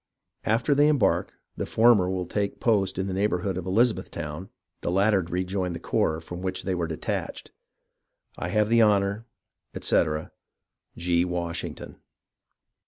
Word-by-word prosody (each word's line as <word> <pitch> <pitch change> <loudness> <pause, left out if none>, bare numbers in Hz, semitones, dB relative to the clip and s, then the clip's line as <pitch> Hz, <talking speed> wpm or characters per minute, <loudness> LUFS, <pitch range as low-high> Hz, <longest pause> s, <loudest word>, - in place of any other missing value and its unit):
After 115 +5 +2
they 145 +1 +4
embark, 150 -3 +2 0.3
the - - -3
former 110 -5 +4
will 95 -1 -2
take 100 +2 -2
post 100 -5 +1
in 95 - -1
the 95 - -3
neighbourhood 95 -1 0
of 90 0 -5
Eliza 115 +5 +4
bethtown, - - -7 0.3
the - - -2
latter 100 +2 +3
rejoin 90 +1 -2
the 85 - -5
corps 80 -1 0
from 90 +2 -8
which 95 0 -3
they 95 - -1
were 85 -2 -1
de 80 -1 -5
tached. - - -4 0.8
I - - -4
have 105 +3 +2
the 115 0 +5
honour, 105 +1 +2 0.5
etc. 75 0 0 0.7
G. 85 0 +2
Washington. 85 -2 -4
95 Hz, 150 wpm, -26 LUFS, 90-105 Hz, 0.8 s, the